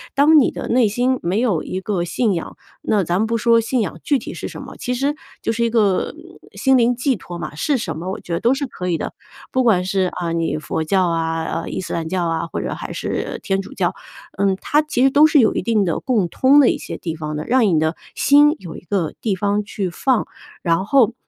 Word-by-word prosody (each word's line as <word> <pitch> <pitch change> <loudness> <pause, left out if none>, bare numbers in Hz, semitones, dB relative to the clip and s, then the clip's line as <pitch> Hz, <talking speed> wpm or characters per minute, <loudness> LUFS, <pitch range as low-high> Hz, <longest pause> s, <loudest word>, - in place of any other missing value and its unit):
当 300 +3 +6
你 265 - +3
的 - - -6
内 240 -2 +4
心 250 +4 0
没 185 +6 0
有 205 -11 +1
一 185 +1 -5
个 185 -4 -1
信 215 +3 0
仰， 165 - -5 0.3
那 210 -3 +1
咱 175 +1 0
们 220 - +1
不 230 +1 0
说 230 0 +4
信 230 +1 0
仰 205 - -4
具 285 - +2
体 - - -7
是 - - -5
什 - - -8
么， - - -10
其 250 - -3
实 275 +4 0 0.3
就 - - -1
是 235 +1 0
一 230 - +1
个 210 -5 +1 0.4
心 265 -1 +3
灵 245 0 +3
寄 255 0 0
托 175 -1 -8
嘛。 170 - -6
是 275 - 0
什 165 -10 -4
么 180 +3 -5
我 - - -4
觉 175 - -10
得 170 - 0
都 240 +3 +3
是 280 +1 -2
可 180 -8 -6
以 170 -2 +1
的， - - -5 0.4
不 260 - +2
管 205 -7 +3
是， 190 +1 0
啊， 170 -1 -3
你 165 -2 -1
佛 160 +1 -3
教 185 +1 +2
啊， 165 -1 -1
呃， 165 +1 -4
伊 - - -3
斯 - - -7
兰 165 -1 -2
教 180 0 -1
啊， 165 0 -1
或 - - -4
者 - - -3
还 - - -6
是 - - -3
天 195 0 0
主 - - -11
教， - - 0 0.4
嗯， 195 -1 +2
它 300 +1 +2
其 295 -5 0
实 270 - +6
都 295 +2 +6
是 300 -1 +4
有 220 - +3
一 - - -1
定 220 -3 +1
的 170 -4 -1
共 220 -9 0
通 275 +8 +5
的 250 - +5
一 - - 0
些 - - -7
地 165 - -4
方 155 -1 -5
的， 150 - -3
让 250 -1 +3
你 170 -5 +2
的 160 +2 0 0.2
心 295 +2 +5
有 170 -3 -9
一 - - -11
个 180 -3 -2
地 205 -4 -1
方 205 +2 0
去 195 -2 -3
放， 245 +7 0 0.4
然 170 +2 +1
后 240 -2 +4
205 Hz, 275 characters per minute, -20 LUFS, 175-250 Hz, 0.4 s, 当